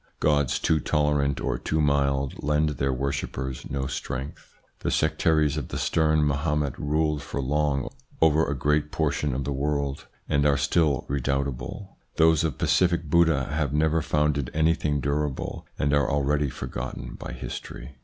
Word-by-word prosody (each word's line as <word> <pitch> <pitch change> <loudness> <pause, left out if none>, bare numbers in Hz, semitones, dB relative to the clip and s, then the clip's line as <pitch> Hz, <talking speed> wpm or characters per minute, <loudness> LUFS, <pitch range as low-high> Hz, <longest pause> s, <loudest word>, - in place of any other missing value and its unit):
Gods 75 -4 +2
too 80 - +2
tolerant 75 -1 +1
or - - -2
too 80 - -1
mild 70 -2 +1
lend 75 +1 +2
their 70 -1 -1
worshippers 65 -1 -3
no 70 -1 -2
strength. 65 0 -6 0.2
The - - -2
sectaries 75 -1 +2
of 75 - -3
the - - -5
stern 80 -2 +2
Mahomet 75 -1 0
ruled 75 0 0
for 70 - -5
long 70 0 0 0.3
over 80 0 +4
a 70 - -1
great 75 +2 +1
portion 75 -3 0
of 70 - -2
the 70 - -2
world, 70 0 -2 0.2
and 70 0 +2
are 70 -1 +3
still 75 -3 +1
redoubtable; 70 +6 -3 0.2
those 80 -1 +4
of 80 -5 -1
pacific 85 -4 +1
Buddha 80 -6 +4
have 75 -2 -1
never 80 +2 +2
founded 75 -3 0
anything 80 -2 +1
durable, 70 -1 -2
and 70 +1 +1
are 70 -2 +3
already 70 0 +1
forgotten 65 0 -6
by - - -7
history. - - -7
75 Hz, 155 wpm, -26 LUFS, 70-75 Hz, 0.3 s, over